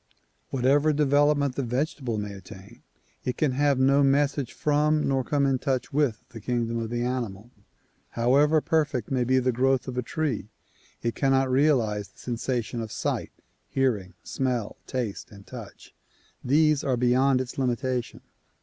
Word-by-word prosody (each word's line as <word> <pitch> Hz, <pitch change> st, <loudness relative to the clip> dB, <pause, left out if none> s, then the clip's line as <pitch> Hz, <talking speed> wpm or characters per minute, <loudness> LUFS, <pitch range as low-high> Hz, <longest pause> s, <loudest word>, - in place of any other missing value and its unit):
Whatever 140 Hz, +4 st, +3 dB
development 145 Hz, -1 st, +3 dB
the -, -, -1 dB
vegetable 130 Hz, -1 st, -2 dB
may 105 Hz, -1 st, -4 dB
attain, 100 Hz, +3 st, -12 dB, 0.4 s
it 125 Hz, -, -3 dB
can 150 Hz, -4 st, +2 dB
have 140 Hz, +1 st, +2 dB
no 135 Hz, +2 st, +4 dB
message 140 Hz, -1 st, +2 dB
from 150 Hz, +1 st, +1 dB
nor 135 Hz, -1 st, +1 dB
come 140 Hz, +1 st, +1 dB
in 135 Hz, -2 st, +1 dB
touch 135 Hz, 0 st, -2 dB
with 140 Hz, -7 st, +1 dB
the 115 Hz, -, -10 dB
kingdom 115 Hz, 0 st, -1 dB
of 115 Hz, -1 st, -3 dB
the 120 Hz, 0 st, -2 dB
animal. 120 Hz, -3 st, -4 dB, 0.7 s
However 145 Hz, +6 st, +4 dB
perfect 150 Hz, -, 0 dB
may 130 Hz, -2 st, +2 dB
be 130 Hz, +2 st, +2 dB
the 130 Hz, 0 st, +2 dB
growth 130 Hz, +2 st, +1 dB
of 125 Hz, -1 st, -3 dB
a -, -, +1 dB
tree 125 Hz, -, -3 dB, 0.5 s
it 115 Hz, -1 st, 0 dB
cannot 135 Hz, 0 st, +2 dB
realize 120 Hz, -8 st, +2 dB
the -, -, -31 dB
sensation 120 Hz, -1 st, -3 dB
of 110 Hz, -2 st, -6 dB
sight, -, -, -2 dB, 0.4 s
hearing, 105 Hz, -9 st, 0 dB
smell, 125 Hz, -5 st, -2 dB
taste 120 Hz, -6 st, -4 dB
and 100 Hz, -1 st, -14 dB
touch; -, -, -11 dB, 0.5 s
these 150 Hz, +2 st, +3 dB
are 130 Hz, -2 st, 0 dB
beyond 130 Hz, +2 st, +3 dB
its 130 Hz, +1 st, -5 dB
limitation. 125 Hz, -1 st, -2 dB
130 Hz, 155 wpm, -26 LUFS, 120-140 Hz, 0.7 s, no